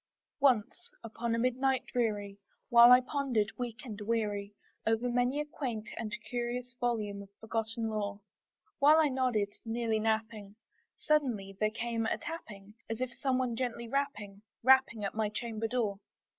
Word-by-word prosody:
Once 265 - +2
upon 230 +1 -2
a - - -1
midnight 255 +2 +1
dreary, 205 -4 -2 0.3
while 240 0 +9
I 250 0 +9
pondered, 255 -6 0
weak 245 0 -5
and 215 -3 -7
weary, 205 -2 -1 0.3
Over 225 +2 +1
many 245 +3 +1
a 300 - -1
quaint 245 -8 -4
and 220 -2 -4
curious 245 0 -3
volume 215 -5 -1
of 200 - -12
forgotten 225 0 -2
lore, 205 -2 -3 0.6
While 300 +2 +7
I 315 -2 +4
nodded, 245 -6 0
nearly 225 -1 -1
napping, 220 -2 -2 0.4
suddenly 240 -11 0
there 215 - +3
came 225 0 -2
a - - 0
tapping, 210 -12 -8 0.2
As 225 0 -3
of 255 -1 -2
some 265 -1 0
one 250 -2 0
gently 235 -1 -3
rapping 220 -7 -3 0.2
rapping 260 -4 +4
at 195 - -3
my 220 -1 0
chamber 225 +1 -3
door. 220 -4 -1
230 Hz, 155 wpm, -32 LUFS, 215-250 Hz, 0.6 s, while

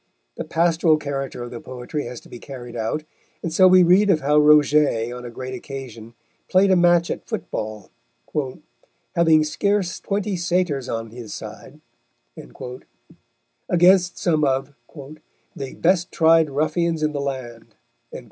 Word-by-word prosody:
The - - -4
pastoral 165 -1 +2
character 135 -4 -5
of 120 - -8
the 120 - -7
poetry 130 +4 -6
has 120 0 -7
to - - -17
be 120 - -11
carried 120 -3 -9
out, 115 +7 -2 0.4
and 165 - -3
so 185 +2 +6
we 185 0 +7
read 185 +4 +4
of 160 -5 +3
how 150 +2 +3
Roget 150 -5 +4
on 125 0 -8
a - - -6
great 130 +2 -7
occasion 120 -3 -9 0.3
played 190 +1 +4
a - - +5
match 175 -1 +3
at - - -6
football, 105 -2 -5 1.2
"having 165 -2 +4
scarce 185 +3 -1
twenty 200 0 -2
Satyrs 175 -6 -1
on 115 -1 -4
his 115 -3 -8
side," - - -10 1.9
against 180 +1 +4
some 155 -4 +1
of 135 0 0 0.8
"the 135 -1 -7
best 175 0 +1
tried 165 -1 +4
Ruffians 160 +3 -1
in 155 - +1
the 145 -1 -3
land." 125 -5 -6
150 Hz, 145 wpm, -22 LUFS, 125-175 Hz, 1.9 s, we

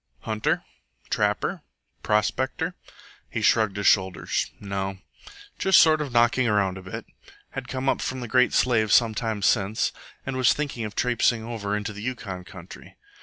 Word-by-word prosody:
Hunter? 110 -1 -1 0.5
Trapper? - - 0 0.4
Prospector? 105 +5 0 0.6
He - - -3
shrugged 110 -3 +3
his 100 - -3
shoulders 95 -3 +2
No; 95 -1 -4 0.6
just 190 -1 +6
sort 155 -1 +5
of 145 -3 -4
knocking 120 +1 +3
round 100 -3 +1
a - - -10
bit. 95 0 -7 0.5
Had 135 -2 -6
come 130 +1 -4
up - - +1
from 130 - -3
the 120 - -5
Great 125 +2 +3
Slave 110 -4 +2
some 115 0 +5
time 110 -2 -3
since, 105 -1 +2 0.3
and 135 - -3
was 130 -1 +4
thinking 140 -6 -3
of 105 - -7
trapsing 120 -2 +1
over 105 -3 -3
into 105 0 -4
the 105 - -8
Yukon 105 -7 -5
country. 90 -1 -12
110 Hz, 160 wpm, -25 LUFS, 100-125 Hz, 0.6 s, just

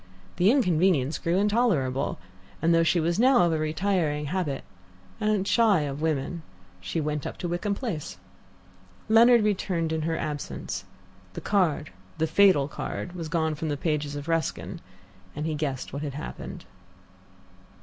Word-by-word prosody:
The 180 +3 +4
inconvenience 180 - +2
grew 170 +2 0
intolerable, 195 - +1 0.4
and 170 +1 +3
though 165 - +5
she 165 +1 +3
was 170 +4 0
now 250 -4 +5
of 170 -1 +2
a 160 - 0
retiring 155 -1 0
habit, 150 -4 -2 0.6
and 210 -2 +1
shy 215 -8 +4
of 145 0 -4
women, 160 +1 -1 0.4
she 90 - -3
went 150 -2 -2
up - - -7
to 175 - -4
Wickham 175 +4 -1
Place. 200 - -4 0.9
Leonard 230 +1 +6
returned 180 -5 0
in 160 - -1
her 165 +1 -1
absence. 150 -3 -4 0.5
The - - -6
card, 180 - +1 0.3
the 160 - +1
fatal 160 -4 +4
card, 175 +4 -5
was 165 -3 -5
gone 160 -1 0
from 155 +1 -4
the 145 - -1
pages 150 -1 -1
of 145 +1 -6
Ruskin, 165 -1 -2 0.5
and 150 +1 -3
he 160 - -1
guessed 145 -5 -3
what 140 - -4
had 145 -3 -4
happened. 150 - -7
165 Hz, 155 wpm, -26 LUFS, 150-190 Hz, 0.9 s, Leonard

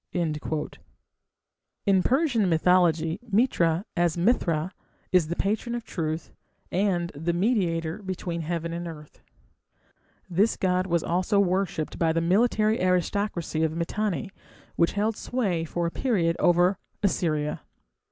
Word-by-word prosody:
" - - -42
In 155 -4 -1 1.6
Persian 250 - +2
mythology 165 0 +3
Mitra, 195 -6 +2
as 175 -1 +1
Mithra, 170 -4 +1 0.4
is 180 -4 +4
the 170 - -3
patron 220 +6 -1
of 240 - -4
Truth, 160 -5 -4 0.4
and 175 -2 0
"the 165 +4 -2
Mediator" 175 -3 0
between 180 -3 -4
heaven 170 +1 -3
and 170 0 -4
earth. 150 -2 -11 1.1
This 195 +5 +2
god 185 -1 +1
was 170 -2 +1
also 185 +4 +1
worshipped 185 -4 0
by 165 -1 +2
the 165 - +1
military 215 +5 +2
aristocracy 180 -2 0
of 160 0 0
Mitanni, 200 +3 -2 0.4
which 170 - +2
held 210 +2 0
sway 195 -10 -1
for 170 +1 -2
a 170 - -1
period 175 -10 +1
over 175 +2 +3 0.2
Assyria. 155 -6 0
175 Hz, 125 wpm, -26 LUFS, 165-200 Hz, 1.6 s, is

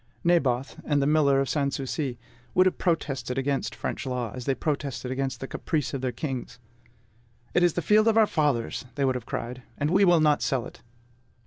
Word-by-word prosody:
Naboth, 135 -7 +1
and 145 -2 +1
the 140 - +2
miller 145 -2 +4
of 135 - 0
Sans 140 +1 0
Souci, 135 -1 -3 0.4
would 185 - +6
have 185 - +1
protested 135 -7 -1
against 135 +1 -1
French - - -4
law, 125 -4 -2
as 125 -1 -7
they 135 - +1
protested 140 -4 -3
against 135 0 -2
the 135 - -4
caprice 150 -1 -2
of 135 - -3
their 130 -1 -1
kings. 125 -1 -5 1.0
"It 175 - +3
is 175 -2 +4
the 175 - -2
field 215 +1 +4
of 225 0 +4
our 220 - +7
fathers," 145 - 0
they 140 -2 +1
would 130 - +2
have 125 -3 -6
cried, 125 +2 -4 0.2
"and 145 +2 0
we 195 +2 +4
will 175 -3 +6
not 150 -2 +3
sell 130 -3 0
it!" - - -12
140 Hz, 205 wpm, -26 LUFS, 130-155 Hz, 1.0 s, our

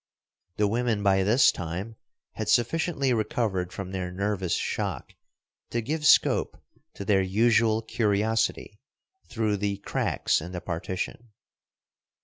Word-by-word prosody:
The 105 - +3
women 115 -1 0
by 95 -1 +3
this 110 +7 +5
time 90 +6 -5 0.4
had 110 -1 -4
sufficiently 135 +3 +1
recovered 105 -5 -1
from 95 -2 -6
their 95 -1 -4
nervous 95 -2 -1
shock - - -3 0.6
to 120 - -1
give 150 +6 -1
scope - - +4 0.4
to 100 - -6
their 95 -1 +3
usual 110 +3 +2
curiosity 110 -1 0 0.5
through 110 -3 -1
the 100 0 -2
cracks 100 - 0
in 90 +3 -8
the 90 - -3
partition. 95 +7 -5
105 Hz, 125 wpm, -26 LUFS, 95-115 Hz, 0.6 s, this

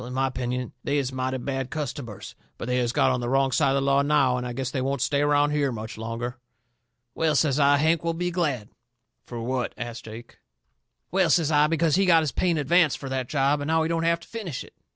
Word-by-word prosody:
"In 125 +1 -7
my 135 0 +2
opinion 125 -1 -3
they 145 - 0
is 135 -2 -1
mighty 130 0 -2
bad 135 0 -3
customers. 140 -8 -6 0.2
But - - -6
they 125 0 0
has 120 -1 0
got - - +3
on 125 - 0
the 120 0 -3
wrong 135 0 +2
side 135 - +2
of 135 - +2
the 140 - +1
law 140 0 +3
now, 140 -3 +3
and 125 0 -3
I - - -4
guess 130 0 -3
they 130 - -2
won't 135 +1 -1
stay 140 +4 +1
around 145 0 +3
here 145 -2 +1
much 110 -1 -6
longer." 115 +2 -5 0.7
"Well," 160 -2 +1
says 140 -1 +2
I, 145 0 +5
"Hank 160 +3 +2
will 165 0 -1
be 180 +1 -2
glad." 145 - -1 0.6
"Fur 120 -1 -6
what?" 125 +1 -2
asts 120 -1 -6
Jake. 115 +2 -11 0.7
"Well," 185 -2 +2
says 160 0 +3
I, 150 0 +4
"because 165 0 +2
he 195 -1 +2
got 165 -2 +5
his 150 - -1
pay 180 - 0
in 170 - +1
advance 155 +2 +3
fur 135 - -7
that 130 -2 -3
job 145 0 +1
and 145 - -3
now 160 0 +2
he 160 - -1
don't 165 0 0
have 170 0 +1
to - - -14
finish 200 - -5
it. - - -17
140 Hz, 250 wpm, -25 LUFS, 125-155 Hz, 0.7 s, I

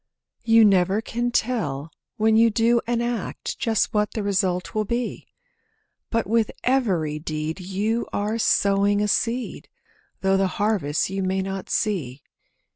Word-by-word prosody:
You 225 -1 +5
never 190 0 +3
can 240 +2 -2
tell 165 - -1 0.3
when 220 0 +3
you 230 +1 +6
do 230 +2 +2
an 240 0 0
act 235 -4 -4
Just 225 -6 +1
what 210 0 0
the 215 - -2
result 190 -3 0
will 215 - 0
be; 235 +3 -3 0.8
But 230 -1 0
with 225 0 +1
every 185 - +1
deed 155 +2 -4
you 205 +5 -2
are 210 +3 -1
sowing 200 -1 +2
a - - +1
seed, 235 +4 -1 0.5
Though 195 0 +3
the 195 0 +2
harvest 195 -7 0
you 195 0 -2
may 190 0 0
not 195 0 -5
see. 150 - -2
205 Hz, 145 wpm, -23 LUFS, 190-230 Hz, 0.8 s, you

